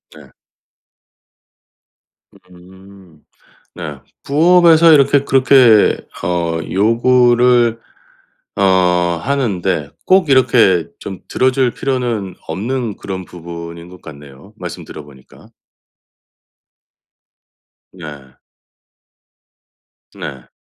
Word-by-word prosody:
네. - - -16 2.2
음. 95 -2 -18 0.5
네. 75 -5 -8 0.2
부업에서 165 +2 +4
이렇게 140 -1 +3
그렇게 130 -5 +4 0.3
어 85 -1 -2
요구를 120 +2 +2 0.8
어 - - -3 0.6
하는데 95 - -2 0.2
꼭 185 -4 +2
이렇게 115 - +3
좀 95 -2 -8
들어 130 0 +1
줄 130 -2 0
필요는 120 -8 -3
없는 110 +6 -4
그런 95 -2 -7
부분인 85 0 -10
것 90 0 -15
같네요 70 -3 -14
말씀 - - -8
들어 75 - -10
보니까. 70 -3 -19 2.4
네. 75 -7 -12 1.8
네. 65 -3 -9
100 Hz, 150 characters per minute, -16 LUFS, 85-130 Hz, 2.4 s, 부업에서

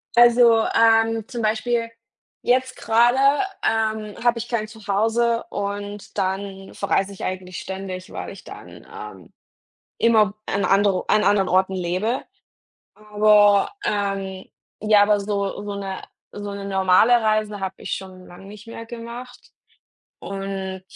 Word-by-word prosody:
Also, 235 -1 +6
ähm, 225 -1 +3
zum 240 -3 -5
Beispiel 230 +2 0 0.5
jetzt 255 +1 +1
gerade, 235 +3 +3 0.5
ähm, 220 -1 -1
habe 240 -1 +3
ich 235 - -5
kein 225 -3 -2
Zuhause 225 +2 0
und 205 0 -5
dann 195 0 -3
verreise 200 0 0
ich 195 - -9
eigentlich 185 -1 -5
ständig, 190 0 -7
weil - - -6
ich - - -12
dann, - - -12
ähm, 425 -1 -10 0.6
immer 220 -3 +3
an 200 - -1
andere 195 -1 +2
an 210 0 +4
anderen 195 -2 +3
Orten 190 +1 +2
lebe. 185 +7 -1 0.7
Aber, 210 -1 +4 0.2
ähm 195 -2 -2 0.4
ja, 210 -1 +5
aber 205 0 +3
so 200 0 -3
so 205 0 -5
'ne 195 -1 -5 0.3
so 205 0 -6
'ne 200 0 -6
normale 190 +4 +4
Reise 215 -1 0
habe 190 0 -4
ich - - -6
schon 185 -1 -10
lange 175 +2 -13
nicht 210 +2 -12
mehr 230 0 -8
gemacht. 235 +2 -10 0.7
Und 195 -1 -5
205 Hz, 135 wpm, -22 LUFS, 195-225 Hz, 0.7 s, Also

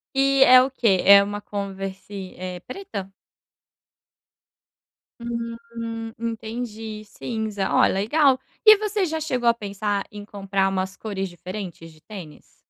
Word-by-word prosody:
E 275 0 +5
é 255 0 +9
o 265 +1 0
quê? 205 -8 +2
É 200 0 +9
uma 205 +1 -4
Converse, 195 -1 -6
eh, 180 -1 -5
preta? 215 - -7 2.1
Hum, 230 -1 -5
entendi, 225 -1 -5
cinza. 215 -2 -3
Oh, - - +5
legal. 260 +7 +3 0.2
E 430 -1 +9
você 420 -1 -1
já 320 -1 -2
chegou 250 -6 +1
a - - +5
pensar 205 -2 -2
em 205 -1 -8
comprar 195 -1 -1
umas 190 0 -2
cores 195 -3 -4
diferentes 180 -2 -8
de 155 - -20
tênis? 180 -8 -11
215 Hz, 130 wpm, -24 LUFS, 195-235 Hz, 2.1 s, é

